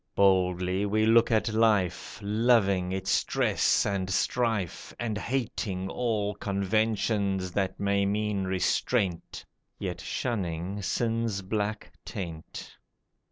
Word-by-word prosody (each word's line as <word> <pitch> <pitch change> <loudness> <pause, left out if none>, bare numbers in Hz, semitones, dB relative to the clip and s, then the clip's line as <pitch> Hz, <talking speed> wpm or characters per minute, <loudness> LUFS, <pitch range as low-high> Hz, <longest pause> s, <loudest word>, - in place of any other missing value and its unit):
Boldly 90 -1 +2
we 110 +2 +2
look 115 +1 +5
at 110 -1 +2
life, 105 -6 +1
Loving 100 -4 +2
its 95 +1 -2
stress - - +2
and 95 -2 -1
strife, 110 -2 -1
And 115 -3 -2
hating 105 -6 -2
all 110 -4 -1
conventions 100 -1 0
that 95 0 -1
may 100 0 +1
mean 105 -1 -1
restraint, 95 0 -1 0.3
Yet - - -4
shunning 95 -4 -3
sin's 115 -1 -1
black 105 +2 -3
taint. 85 -8 -7
100 Hz, 105 wpm, -28 LUFS, 95-110 Hz, 0.3 s, look